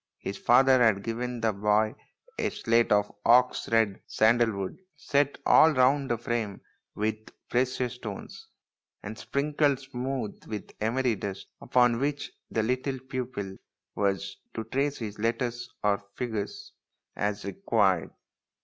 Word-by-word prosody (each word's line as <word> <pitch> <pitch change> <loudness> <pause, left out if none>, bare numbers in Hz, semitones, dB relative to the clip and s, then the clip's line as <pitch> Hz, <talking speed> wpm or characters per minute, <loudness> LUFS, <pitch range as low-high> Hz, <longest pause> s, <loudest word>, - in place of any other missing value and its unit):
His 100 - -5
father 130 +1 +5
had 110 -4 +4
given 120 +1 -3
the 110 -1 +2
boy 105 +2 +2 0.5
a - - +1
slate 115 0 +1
of 105 0 +3
ox 125 +1 +4
red 110 -4 +2
sandal 115 +1 +3
wood, 100 - -5 0.2
set 145 -1 +1
all 160 - +7
round 135 +1 +3
the 120 - +1
frame 115 -3 -3 0.4
with 110 +1 -1 0.3
precious 125 0 0
stones, 110 -5 -8 0.6
and 105 +2 -6
sprinkled 145 +1 0
smooth 130 -3 -4
with 105 -2 -6
emery 120 +3 +1
dust, 100 -1 -6
upon 125 -2 +3
which 145 +1 -2 0.2
the 110 - 0
little 130 +3 -1
pupil 125 -7 -5 0.4
was 100 -1 -1 0.2
to 115 - -3
trace 140 +5 -1
his 110 -2 -6
letters 120 +1 -1
or 105 -1 +2 0.2
figures 110 -5 -4 0.4
as 105 0 -2
THE 100 - -3
PRINCE - - -19
WONDERFUL 115 - 0
161 95 -4 +5
required. - - -31
115 Hz, 145 wpm, -28 LUFS, 105-130 Hz, 0.6 s, all